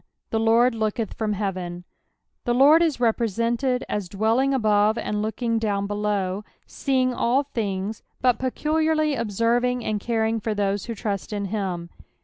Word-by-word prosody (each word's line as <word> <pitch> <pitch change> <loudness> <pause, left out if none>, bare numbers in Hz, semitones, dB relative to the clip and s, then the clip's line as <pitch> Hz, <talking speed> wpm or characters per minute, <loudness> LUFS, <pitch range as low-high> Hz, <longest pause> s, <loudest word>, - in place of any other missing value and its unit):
The 225 - +1
Lord 230 +2 +4
looketh 220 -1 -2
from 215 -2 -2
heateny 185 -3 -4 0.6
The 240 -1 +1
Lord 290 +6 +7
ia 335 - +4
represented 235 +2 0
as 205 -4 -3
dwelling 225 +7 +1
above 215 -4 +3
knd 210 0 -2
looking 225 +1 -1
down 200 -3 -1
below; 205 -1 -1 0.2
sceiDZ^ll 255 0 +1
things, 205 -1 -2 0.2
but 250 -2 +2
peculiarly 310 +3 +1
observing 235 +2 0
ana 215 -1 -1
coring 225 0 0
for 215 0 -2
those 200 -1 -1
who 230 - -5
trust 200 -2 -3
in 205 -1 -2
him. 180 -5 -3
225 Hz, 140 wpm, -24 LUFS, 205-245 Hz, 0.6 s, Lord